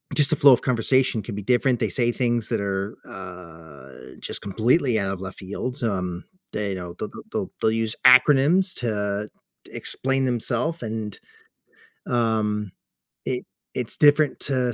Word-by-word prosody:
just 145 -1 +3
the - - +4
flow 140 0 +7
of 120 - +2
conversation 125 -1 +2
can 105 -2 -7
be 105 - -4
different. 125 +1 +2
They - - +1
say 120 -2 +1
things 120 -3 0
that 115 -3 0
are, 100 +1 -3
uh, 80 -8 -11
just - - -4
completely 115 - +2
out 95 0 -1
of 95 -1 -5
left 95 0 -7
fields, 125 +7 -5
um, 90 -4 -2 0.3
they 105 -1 -2
you 95 - -2
know, 90 -1 -7
they'll - - -4
th - - -11
they'll - - -3
they'll 110 - +3
use 115 -1 -1
acronyms 150 +8 +6
to 105 -3 -2 0.4
explain 135 0 -1
themself, 125 +6 -1
and, 110 -1 -4 0.9
um, 110 -4 0 0.6
it 125 -1 -2 0.3
it's 125 -3 -3
different 150 0 +4
to 125 -3 0
115 Hz, 160 wpm, -24 LUFS, 100-130 Hz, 0.9 s, flow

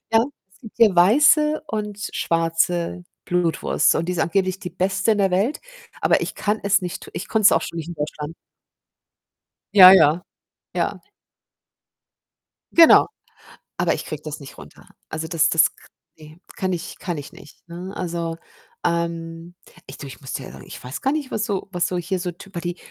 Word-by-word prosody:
Ja, 225 +1 +5 0.3
es - - -26
gibt 225 -4 -13
hier 220 -5 +5
weiße 300 - +5
und 210 -5 -4
schwarze 170 +1 0 0.2
Blutwurst 175 -3 +1
und 165 - -1
die 180 - -1
ist 180 - -4
angeblich 185 +3 0
die 180 - -6
beste 190 +4 0
in 210 - -1
der 195 -2 +2
Welt, 205 +11 0 0.4
aber - - +3
ich - - -4
kann 210 +1 -1
es 200 0 +2
nicht 180 -1 -6
ich - - -6
konnte 220 - 0
es - - +7
auch - - +2
schon - - -6
nicht 165 0 -5
in 175 - -6
Deutschland. 150 0 -5 1.4
Ja, 185 -3 +11
ja, 170 -2 +5 0.5
ja. - - -2 1.7
Genau, 330 -1 +7 0.7
aber - - +2
ich - - -6
kriege 155 -2 -7
das 155 -1 -6
nicht 140 -2 -12
runter. 75 -1 -14 0.2
Also, 160 0 -4
das 160 -1 +2
das 165 - +3
k - - -20 0.3
ne, 155 +2 -15 0.2
kann 185 -1 -1
ich 175 -2 -5
kann 175 -4 -4
ich 145 - -9
nicht, 145 - -17
ne? 175 +3 -7
Also, 170 -2 -3 0.5
ähm, 170 0 -3 0.3
ich 135 - -11
du, 140 - -8
ich 135 - -11
muss 135 -3 -8
dir 130 - -5
ehrlich - - -12
ich - - -10
weiß 130 +4 -6
gar 270 - +1
nicht, 295 -3 -3
was 215 - -1
so 200 -2 -3
was 175 -1 0
so 180 - -3
hier 180 +2 -3
so 180 0 -3
typer 175 +1 -9
die 175 0 -4
175 Hz, 185 wpm, -22 LUFS, 165-195 Hz, 1.7 s, Ja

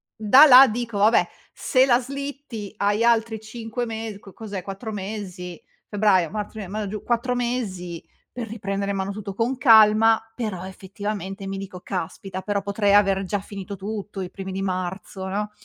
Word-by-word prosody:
da 235 +7 +7
là 265 -1 +10
dico: 230 -1 -3
"Vabbè, 215 +3 +4 0.3
se 260 -2 +3
la 245 -2 +4
slitti 275 -5 -7
hai 205 +3 +1
altri 225 -1 +2
5 225 +2 -5
mes 220 -2 -5
co 195 -2 -14
cos'è? 205 -4 -6
4 195 +4 -6
mesi, 190 -4 -6 0.3
febbraio, 200 -5 +2
marzo, 210 +2 -4
aprile, 215 -4 -7
maggio, 210 +1 -4
giu 210 0 -6
4 245 +1 0
mesi 200 -9 -3 0.3
per 240 -2 -6
riprendere 200 -2 -3
in 200 - -2
mano 195 +1 -2
tutto 200 -1 -6
con 235 +5 -1
calma", 225 -3 +6 0.2
però 210 -7 -4
effettivamente 195 0 -6
mi 195 0 -4
dico: 190 -2 -8
"Caspita, 190 +1 -5
però 200 +1 -1
potrei 200 0 +1
aver 195 -1 +4
già 205 +2 -1
finito 200 0 -7
tutto 200 0 -6
i 180 - -6
primi 190 -1 -7
di 195 - -3
marzo, 190 +1 -4
no?" 210 +2 -3
205 Hz, 175 wpm, -23 LUFS, 195-225 Hz, 0.3 s, là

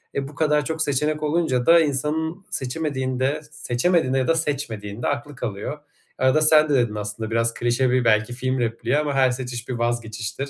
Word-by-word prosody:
E, 140 -1 -2
bu 145 - -12
kadar 150 -2 +2
çok 160 0 -2
seçenek 150 +2 0
olunca 150 -5 +1
da 170 0 +7
insanın 160 +5 -1
seçemediğinde, 130 0 -2
seçemediğinde 135 +1 +1
ya 130 - 0
da 165 - +3
seçmediğinde 120 -9 -3
aklı 145 0 -3
kalıyor. 120 +5 -5 0.4
Arada 130 +4 +3
sen 155 0 +5
de 145 - +2
dedin 120 -4 +1
aslında, 105 +1 -5
biraz 115 0 +1
klişe 120 +2 +1
bir 125 -1 +2
belki 110 +1 +2
film 130 +1 -2
repliği 115 +3 0
ama 150 -1 0
"Her 130 -2 +4
seçiş 125 -2 -5
bir 125 - -1
vazgeçiştir." 120 +1 -3
130 Hz, 175 wpm, -23 LUFS, 120-150 Hz, 0.4 s, da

